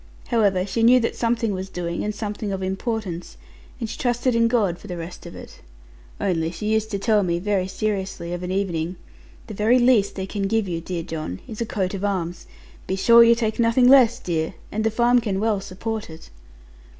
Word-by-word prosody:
However, 200 -6 +2
she 225 +3 -2
knew 245 +3 +6
that 230 - -1
something 230 -2 0
was 190 0 -5
doing 170 -2 -4
and 210 0 -3
something 210 -1 -4
of 190 -1 -3
importance; 190 -2 -4 0.4
and 230 - -3
she 220 - -7
trusted 245 +1 +1
in 230 0 +3
God 210 -8 +1
for - - -12
the 180 -3 -5
rest 170 +1 -8
of - - -10
it. - - -11 0.6
Only 165 -4 0
she 210 +6 -2
used 220 0 0
te 200 - -2
tell 210 +1 +2
me, 170 -3 0
very 190 0 0
seriously, 190 -3 -3
of 175 - -4
an 180 - -4
evening, 185 -3 -2 0.5
'The 215 - -8
very 215 +5 +3
least 240 -5 +3
they 190 - -3
can 195 0 -3
give 220 0 0
you, 170 -2 -3
dear 170 0 -4
John, 155 - -5
is 220 0 -7
a 230 - -1
coat 190 -3 -2
of 195 0 -4
arms. 180 -4 -2 0.4
Be 190 - -1
sure 235 +4 +7
you 235 0 +6
take 225 -1 -2
nothing 235 +2 +4
less, 250 -3 +6
dear; 170 -6 -2 0.2
and 215 +1 -2
the 225 - +2
farm 240 +2 +3
can 200 -4 -2
well 210 -2 0
support 205 +2 -5
it.' 160 0 -12
205 Hz, 210 wpm, -23 LUFS, 185-230 Hz, 0.6 s, sure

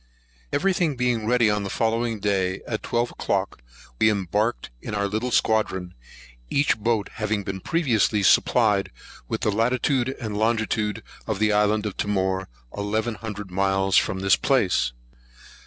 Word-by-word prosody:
EVERY 195 +1 +2
thing 165 -5 0
being 120 -3 0
ready 120 -1 +3
on 105 0 +1
the 100 - -4
following 115 0 0
day, 95 -2 0
at 110 -2 -3
twelve 120 +1 -1
o'clock, - - -2 0.4
we 110 - +5
embarked 105 - -1
in 110 - -5
our 100 0 0
little 110 +5 -2
squadron, 95 -7 0 0.6
each 145 +1 +2
boat 110 -1 0
having 105 -1 -1
been 95 0 -4
previously 115 - +1
supplied 105 0 +3 0.4
with - - -3
the 105 - +1
latitude 125 +4 +1
and 110 -4 -4
longitude 110 -1 0 0.2
of 110 -3 -1
the 110 +1 +2
island 105 +1 +2
of 105 - -4
Timor, 95 -2 -1 0.3
eleven 110 +3 -1
hundred 105 -3 -7
miles 95 0 +1
from 95 - +2
this 95 -1 +5
place. 100 - +1
105 Hz, 150 wpm, -24 LUFS, 100-115 Hz, 0.6 s, we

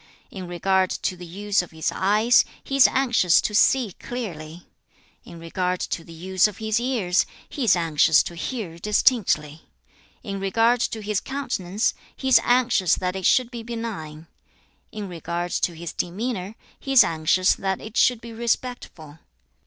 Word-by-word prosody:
In 185 -2 -7
regard 185 +2 +1
to 185 - -3
the 175 -1 -10
use 200 +3 0
of 180 - -10
his 160 -1 -3
eyes, 215 +5 +3 0.2
he 275 - -4
is 275 - +7
anxious 240 -10 +3
to 210 - -3
see 240 0 +3
clearly. 170 -9 -7 0.6
In 170 - -11
regard 180 +2 -2
to 165 - -4
the 165 - -14
use 185 +4 +1
of 210 -1 -9
his 220 0 -1
ears, 230 -8 0 0.2
he 280 -5 -4
is 200 - +5
anxious 160 -2 +3
to - - -7
hear 170 0 -5
distinctly. 180 - +1 0.6
In 195 -3 -5
regard 225 +5 +2
to 220 -2 -2
his 210 -1 -1
countenance, 230 -8 -2 0.2
he 265 - -3
is 260 - +7
anxious 245 -7 +3
that 180 0 -3
it 190 -2 0
should 250 -2 +3
be 240 -2 -6
benign. 220 -10 -6 0.7
In 210 -2 -6
regard 175 0 -4
to 175 - -1
his 170 0 -7
demeanor, 200 +2 -4 0.2
he 270 - -4
is 255 -4 +9
anxious 165 +2 +2
that 190 -1 -3
it 220 +1 -10
should 245 -3 +3
be 235 -1 -9
respectful. 225 - -4
195 Hz, 165 wpm, -23 LUFS, 175-235 Hz, 0.7 s, is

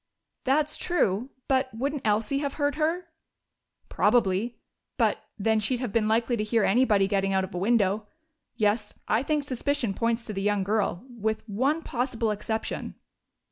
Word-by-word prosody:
"That's 295 +3 +2
true. 245 - 0 0.2
But 260 -1 +2
wouldn't 280 +4 -2
Elsie 215 +6 +1
have 280 -1 -3
heard 290 -1 +1
her?" 330 +4 -1 0.8
"Probably. 230 0 +2 0.4
But, - - +2 0.2
then, 220 +1 +2
she'd 235 +4 -1
have 245 -4 -3
been 215 0 +2
likely 230 +2 +2
to 210 - 0
hear 220 0 +2
anybody 205 -3 +4
getting 195 -1 +1
out 190 0 +2
of 190 - -6
a 180 - -2
window.... 210 0 +2 0.5
Yes, 210 -1 0
I 220 - +2
think 300 +1 0
suspicion 265 -4 -1
points 230 +2 0
to 215 - -4
the 195 - -3
young 205 -1 +1
girl, 205 0 0
with 220 -3 -3
one 270 +10 0
possible 240 -3 -1
exception." 220 +2 -3
225 Hz, 160 wpm, -27 LUFS, 210-260 Hz, 0.8 s, anybody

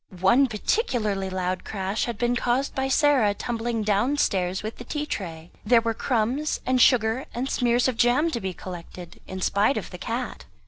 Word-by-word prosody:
One 240 +8 +5
particularly 215 - -1
loud 185 -1 -2
crash 195 0 -2
had 235 -3 -4
been 240 +2 +1
caused 250 +3 0
by 265 0 -1
Sarah 270 -7 +3
tumbling 230 0 -2
downstairs 205 -4 +1
with 215 +1 -5
the - - -8
tea 295 +4 -3
tray; 170 - -6
there 235 +2 +5
were 230 0 -1
crumbs 250 +6 -1
and 255 -1 +2
sugar 235 +1 +4
and 250 +3 -2
smears 245 -2 +2
of 255 -3 -1
jam 250 +8 +3
to 235 - -3
be 190 - -2
collected, 175 -1 -9
in 190 0 -6
spite 210 +7 +2
of 215 - -5
the 180 - -8
cat. 240 +4 -4
230 Hz, 180 wpm, -25 LUFS, 195-255 Hz, -, One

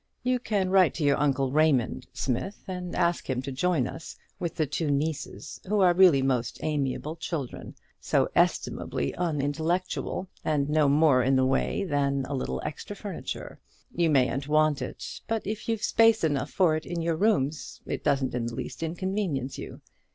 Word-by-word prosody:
You 250 0 +1
can 200 -6 -1
write 190 -4 +5
to 165 - -2
your 140 -1 +3
uncle 135 -2 +1
Raymond, 150 -5 +2
Smith, 135 - -3
and 180 -1 -5
ask 170 -3 0
him 130 -1 0
to 135 - -4
join 150 0 +1
us, 160 - -8 0.2
with 170 -3 -3
the 155 - +1
two 150 +2 -2
nieces, 145 0 -3
who 210 +1 +2
are 180 -2 +6
really 175 -7 +6
most 125 -3 0
amiable 150 +1 -1
children; 160 -5 -5 0.2
so - - +1
estimably 70 - 0
unintellectual, 165 +4 -1 0.2
and 145 -3 +1
no 150 -1 +3
more 145 -3 +5
in 135 +2 +2
the 130 0 +3
way 135 +9 0
than 140 -5 0
a 140 - -5
little 65 - -2
extra - - -6
furniture: - - -6 0.3
you 170 -1 +2
mayn't 135 -1 +2
want 155 -1 +3
it; - - -6
but 225 -1 -1
if 215 +2 -4
you've 225 -2 -1
space 225 -2 +4
enough 145 -3 0
for 175 -5 +3
it 155 - -5
in 170 -1 -3
your 165 0 +1
rooms, 160 -7 0
it - - -4
doesn't 135 -2 +1
in 120 -1 -1
the 115 - -5
least - - -6
inconvenience 165 -5 -2
you. - - -8
155 Hz, 175 wpm, -27 LUFS, 135-180 Hz, 0.3 s, are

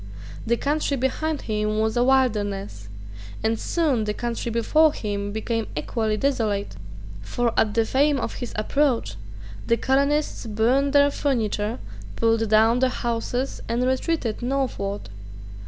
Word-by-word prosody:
The 235 +1 +2
country 290 0 0
behind 290 +4 -1
him 215 -1 -1
was 220 +1 +1
a 240 - +3
wilderness; 205 - 0 0.5
and 225 0 +1
soon 285 -10 0
the 210 0 -2
country 235 0 -3
before 295 +7 +3
him 205 -4 -3
became 225 +1 -2
equally 220 -3 -1
desolate. 215 - -1 0.5
For 235 - -1
at 215 -2 +2
the 225 -1 +3
fame 280 +3 +2
of - - -3
his 245 - -5
approach 235 - 0 0.5
the 230 - +3
colonists 280 +1 +1
burned 245 +6 +2
their 285 0 +5
furniture, 225 -5 -1 0.4
pulled 225 -1 +1
down 220 +3 +4
their 260 0 +3
houses, 245 +2 -2
and 235 +2 +1
retreated 260 -3 -1
northward. 245 - -2
235 Hz, 135 wpm, -24 LUFS, 215-270 Hz, 0.5 s, their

